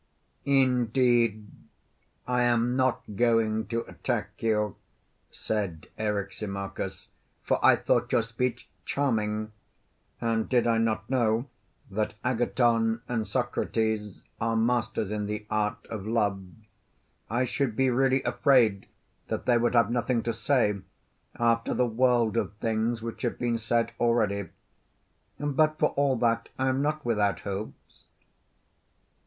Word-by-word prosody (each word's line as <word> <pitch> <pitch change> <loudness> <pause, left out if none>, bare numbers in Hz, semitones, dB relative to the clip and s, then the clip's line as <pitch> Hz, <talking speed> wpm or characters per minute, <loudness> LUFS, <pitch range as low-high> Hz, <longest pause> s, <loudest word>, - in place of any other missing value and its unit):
Indeed, 125 -4 +2 0.8
I 125 0 +1
am 120 0 +2
not 130 -1 +1
going 110 -2 +2
to 115 +2 -1
attack - - -4
you, 105 -3 +1 0.5
said 100 -7 -3
Eryximachus, 100 -2 -4 0.3
for - - 0
I - - +7
thought - - 0
your 115 - +3
speech 120 +2 -3 0.2
charming, 110 -6 -1 0.7
and 115 -1 0
did 125 -2 +3
I 115 -1 +2
not 115 -1 0
know 120 -2 +1 0.5
that 105 +2 -2
Agathon 120 -2 +1
and 115 -3 -2
Socrates 110 -3 -1 0.2
are 115 0 0
masters 110 -3 0
in 105 -1 -2
the 105 0 -4
art 105 +1 -1
of 105 -2 -6
love, 105 -4 0 0.9
I 120 +4 +1
should 125 -2 -1
be 130 +1 +2
really 130 +1 +2
afraid 120 -5 +3 0.4
that - - -3
they 120 -1 +4
would 120 +1 +1
have 115 -1 +4
nothing 120 0 0
to 115 - -1
say, 115 -3 +1 0.6
after 115 -1 +1
the 125 - +3
world 120 -1 +2
of 105 - -1
things 110 +1 -1
which 115 -1 -6
have 120 - -1
been 120 -1 -1
said 115 +1 0
already. 105 -6 +1 0.9
But, 155 +2 +1
for 150 - +3
all 140 -1 +1
that, 115 -1 0
I 130 0 +1
am 130 +1 0
not 150 0 -1
without 105 -4 +1
hopes. 100 +1 -7
115 Hz, 130 wpm, -27 LUFS, 110-125 Hz, 0.9 s, I